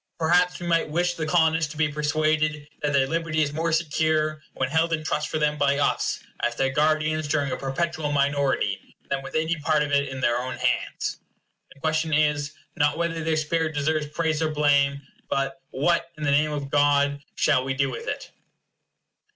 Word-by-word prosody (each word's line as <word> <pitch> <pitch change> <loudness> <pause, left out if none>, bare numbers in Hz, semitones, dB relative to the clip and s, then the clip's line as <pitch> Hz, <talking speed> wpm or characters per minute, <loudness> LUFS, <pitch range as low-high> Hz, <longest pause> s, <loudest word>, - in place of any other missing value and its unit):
Perhaps 175 +2 +2
we 175 - -6
might 165 -2 +1
wish 175 +3 +1
the 160 -2 -4
Colonists 160 -1 +2
to 155 - -9
be 160 0 +3
persuaded 155 0 0
that 145 - 0
their 140 -1 +3
liberty 160 +1 0
is 145 -1 -2
more 165 +2 -1
secure 155 -1 +1
when 130 - 0
held 160 +3 +1
in 155 -1 -1
trust 150 -1 -1
for - - -1
them 150 -1 0
by 140 0 +3
us, 145 - 0 0.2
as 120 0 -1
their 135 +1 +1
guardians 155 +1 +1
during 145 -2 0
a - - 0
perpetual 150 +3 -2
minority, 140 -1 0
than 135 0 0
with 135 - -9
any 160 +1 +1
part 150 0 +1
of 145 - -4
it 140 -1 +2
in 130 0 -6
their 120 -1 +2
own 130 +1 -4
hands. - - -1 0.5
The 140 - -17
question 155 0 0
is, 150 -1 +2 0.2
not 145 +1 +2
whether 165 -1 -1
their 160 0 +1
spirit 155 0 -1
deserves 150 +1 0
praise 155 +1 -1
or 160 - +1
blame, 140 -2 +2 0.3
but 135 0 -1
what, 170 +5 +1
in 155 - -6
the 145 - +2
name 150 +2 +3
of 140 -2 -4
God, 145 -1 +3
shall 140 -4 +3
we 135 0 -2
do 135 -1 +1
with 120 - -7
it? - - -4
150 Hz, 195 wpm, -25 LUFS, 140-160 Hz, 0.5 s, be